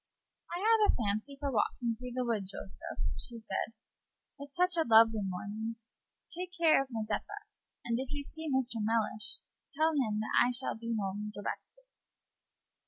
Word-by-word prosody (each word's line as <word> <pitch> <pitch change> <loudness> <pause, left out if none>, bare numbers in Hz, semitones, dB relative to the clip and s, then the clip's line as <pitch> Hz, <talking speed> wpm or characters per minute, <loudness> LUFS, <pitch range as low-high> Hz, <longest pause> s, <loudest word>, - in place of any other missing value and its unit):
"I 345 - -3
have 435 0 +5
a - - -3
fancy 220 +5 -1
for 280 -1 -1
walking 230 0 +1
through 250 +1 -7
the 255 -1 0
wood, 215 -5 0
Joseph," 195 0 -7 0.2
she 235 - -4
said, 225 0 -3 0.7
"it's 285 0 -10
such 360 0 +4
a 330 - +4
lovely 225 -1 +7
morning. 205 +4 -3 0.5
Take 360 +1 -6
care 325 -4 +6
of 270 - -4
Mazeppa; 230 - -3 0.4
and 235 0 0
if 265 +1 -4
you 290 -1 -2
see 320 +2 -4
Mr. 255 -3 +1
Mellish, 215 -1 0 0.4
tell 315 +1 +4
him 220 -8 +1
that 215 - -3
I 245 - +3
shall 245 +2 -1
be 230 +1 -3
home 205 +1 -2
directly." 355 - -6
235 Hz, 165 wpm, -32 LUFS, 215-290 Hz, 0.7 s, lovely